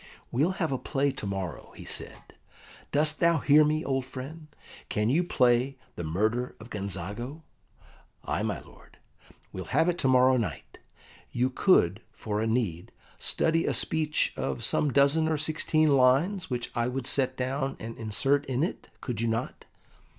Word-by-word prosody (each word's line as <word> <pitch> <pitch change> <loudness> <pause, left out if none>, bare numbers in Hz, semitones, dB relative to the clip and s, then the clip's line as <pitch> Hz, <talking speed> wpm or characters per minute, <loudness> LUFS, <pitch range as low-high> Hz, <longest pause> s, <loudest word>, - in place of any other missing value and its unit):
"We'll 150 +10 +2
have 165 -6 -2
a 130 - -1
play 140 -1 0
to 105 - -6
morrow," 95 -5 -5
he - - -10
said. - - -4 0.6
"Dost 150 +1 +2
thou 170 0 +4
hear 150 +1 +5
me, 155 0 0
old 135 -1 0
friend: 140 +5 -8 0.4
can 105 +3 +1
you 165 +6 +3
play 125 -3 +2 0.2
the 85 - -5
Murder 110 +10 -1
of 115 +3 -12
Gonzago?" 105 - -5 0.8
"Ay, - - -2
my - - -2
lord." - - -19 0.6
"We'll 95 - -5
have 160 - +2
it 175 - -1
to - - +2
morrow 130 0 +5
night. 115 - -5 0.5
You 125 +2 0
could, 110 - +3
for 105 -1 -3
a 110 - 0
need, 110 -8 -1 0.3
study 165 0 +1
a - - +1
speech 155 -1 0
of 65 -2 -3
some 150 - +1
dozen 140 +4 +3
or 160 -1 +1
sixteen 155 0 +2
lines, 140 +9 +3
which 120 -2 -3
I 120 0 0
would 125 0 -3
set 130 -1 +1
down 135 +2 -2
and 115 +1 -7
insert 135 +6 +1
in 130 +2 0
it, 175 - -4
could 120 -4 -3
you 115 - +1
not?" 115 +2 -3
130 Hz, 165 wpm, -28 LUFS, 115-155 Hz, 0.8 s, hear